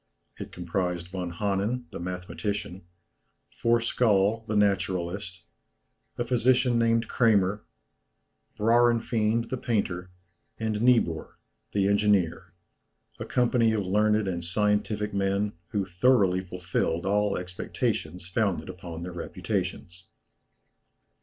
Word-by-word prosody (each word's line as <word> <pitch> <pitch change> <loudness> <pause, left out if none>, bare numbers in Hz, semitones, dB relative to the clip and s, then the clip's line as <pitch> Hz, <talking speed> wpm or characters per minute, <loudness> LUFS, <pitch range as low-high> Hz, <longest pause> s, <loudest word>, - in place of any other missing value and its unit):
It - - -7
comprised 90 0 -3
Von 90 -1 -4
Hannen, 105 +6 -1
the - - -6
mathematician, 90 +2 -4 0.7
Forskaal, 115 -2 +2
the 110 - -2
naturalist, 90 -3 0 0.7
a 120 - -1
physician 125 0 +3
named 115 0 +2
Cramer, 105 -3 +2 0.9
Braurenfeind, 115 0 +2
the 130 - -2
painter, 95 -7 -2 0.5
and 110 -1 -1
Niebuhr, 115 -10 +2 0.4
the 100 -1 +2
engineer, 100 -4 +2 0.7
a - - -4
company 120 -2 +2
of 105 -3 -1
learned 105 +2 +2
and 85 -2 -2
scientific 105 +3 0
men, 100 +1 0
who 100 +1 -1
thoroughly 95 -1 +3
fulfilled 90 -2 -2
all 105 0 +1
expectations 90 -1 -3
founded 100 0 -1
upon 85 -2 -7
their 90 0 -6
reputations. 85 +1 -4
100 Hz, 100 wpm, -27 LUFS, 90-115 Hz, 0.9 s, physician